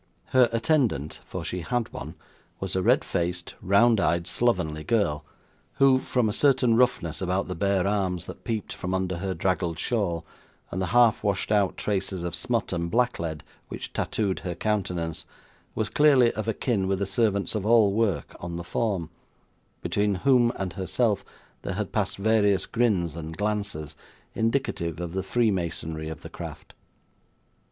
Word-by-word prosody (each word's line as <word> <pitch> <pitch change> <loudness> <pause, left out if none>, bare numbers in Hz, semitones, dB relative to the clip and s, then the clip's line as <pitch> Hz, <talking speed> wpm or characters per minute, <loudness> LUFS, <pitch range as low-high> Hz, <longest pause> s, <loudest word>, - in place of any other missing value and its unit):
Her 125 -2 +5
attendant 115 - +1
for - - -5
she 90 - -3
had 120 +6 -2
one - - -7 0.4
was 95 -1 -3
a 95 - +2
red - - +3
faced, 85 0 -2
round 110 +3 +4
eyed, 85 -2 +1
slovenly 85 -11 0
girl, 100 -10 +1 0.5
who, 135 -1 +5
from 125 -3 0
a 105 - 0
certain 130 -4 +3
roughness 115 -10 +1
about 95 +1 0
the 90 - -3
bare 95 +1 +1
arms 95 -4 0
that - - -10
peeped 110 -3 -3
from 90 +1 -3
under 95 -1 -1
her 95 +1 -3
draggled 90 -3 0
shawl, 85 -5 -1 0.5
and 95 - -2
the 95 - 0
half 115 0 +4
washed 100 -1 0
out 100 -3 +2
traces 95 -3 -2
of 85 -2 -3
smut - - -1
and 85 -1 -2
blacklead 85 -9 0 0.2
which - - -7
tattooed 100 -4 -1
her 90 -2 -4
countenance, 90 -7 -2 0.5
was 110 - 0
clearly 135 -5 +5
of 110 0 -5
a 115 - +1
kin 105 -7 0
with 95 0 +1
the 100 - -1
servants 100 0 +1
of 105 -3 -2
all 110 -2 +5
work 110 -3 0
on 85 0 -5
the 85 - -4
form: 90 -4 -2 0.7
between 105 -1 +1
whom 125 -3 +5
and 95 -3 -4
herself 100 +4 0 0.4
there - - -4
had - - -3
passed - - 0
various 105 -1 +3
grins 95 -9 +1
and 80 -1 -7
glances, 100 -7 -2 0.4
indicative 110 - -1
of 90 -1 -4
the 95 - -1
freemasonry 85 -7 -1
of 80 - -8
the - - -8
craft. - - -9
100 Hz, 165 wpm, -26 LUFS, 85-115 Hz, 0.7 s, Her